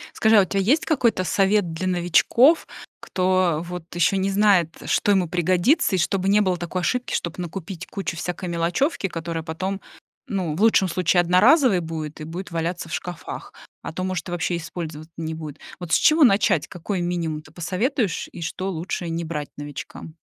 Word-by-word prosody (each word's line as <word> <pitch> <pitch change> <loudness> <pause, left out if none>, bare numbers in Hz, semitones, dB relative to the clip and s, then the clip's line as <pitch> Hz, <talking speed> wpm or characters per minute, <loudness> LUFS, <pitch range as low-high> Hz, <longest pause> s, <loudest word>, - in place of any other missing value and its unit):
Скажи, 220 -1 +4
а - - +8
у 190 - +1
тебя 195 +1 -1
есть 270 +11 +2
какой-то 240 - +2
совет 195 -2 +2
для 185 +3 -3
новичков, 185 - +4 0.3
кто 185 -3 +1
вот 180 -1 -6
ещё 180 +3 +3
не 190 +1 0
знает, 195 -4 +4 0.2
что 205 - +2
ему 190 -3 +3
пригодится, 180 - +2
и - - +1
чтобы 190 +2 0
не 205 +1 +5
было 185 -3 +1
такой 175 +1 -3
ошибки, 250 +6 -1
чтобы 170 -1 -3
накупить 180 +1 -6
кучу 195 -3 -4
всякой 175 +1 -4
мелочёвки, 175 - 0
которая 165 -1 -4
потом, 190 +5 -4 0.5
ну 180 -6 -2
в 185 - -4
лучшем 215 -4 +4
случае 175 0 +2
одноразовой 210 - +5
будет 160 -2 -6
и - - -5
будет 175 +4 -7
валяться 170 +1 -3
в - - -7
шкафах, 175 -1 -6 0.3
а - - -6
то, 185 +3 -4
может, 185 -1 -3
и - - -5
вообще 175 0 -1
использовать 160 -1 -7
не 160 -1 -4
будет. 155 -2 -8 0.2
Вот 175 -3 -7
с - - +6
чего 310 0 +5
начать, 195 - +3
какой 180 +2 -4
минимум 170 -3 -2
ты 155 - -18
посоветуешь? 190 - -1
И 175 - -9
что 185 +3 -3
лучше 170 0 -4
не 165 +1 -3
брать 150 -3 -4
новичкам? 145 +2 -8
180 Hz, 185 wpm, -23 LUFS, 165-195 Hz, 0.5 s, а